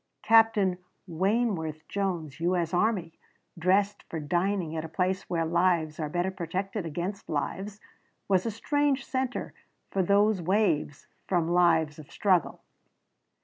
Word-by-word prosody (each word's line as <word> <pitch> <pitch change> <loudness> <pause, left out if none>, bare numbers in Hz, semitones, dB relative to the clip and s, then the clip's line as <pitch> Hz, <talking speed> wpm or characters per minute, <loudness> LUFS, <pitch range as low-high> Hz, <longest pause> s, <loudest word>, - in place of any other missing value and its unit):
Captain 220 -5 +4 0.3
Wayneworth 175 -4 -1
Jones, 175 -8 -3
U. 175 +2 +1
S. 170 -1 -2
Army, 180 -4 0 0.4
dressed 195 +4 +1
for 160 - -4
dining 175 +2 -1
at 160 - -2
a 165 - -7
place 185 +3 -1
where 165 -2 0
lives 170 -2 +1
are 155 -2 -2
better 175 +4 -1
protected 190 +1 -3
against 175 +6 -5
lives, 195 +7 -3 0.5
was 190 -2 +3
a - - +1
strange 275 +4 0
center 260 -3 -3 0.4
for 195 - +1
those 200 +1 +3
waves 175 -6 0 0.2
from 170 -3 +1
lives 165 -4 +3
of 150 - -12
struggle. 185 -5 +1
180 Hz, 135 wpm, -28 LUFS, 165-200 Hz, 0.5 s, Captain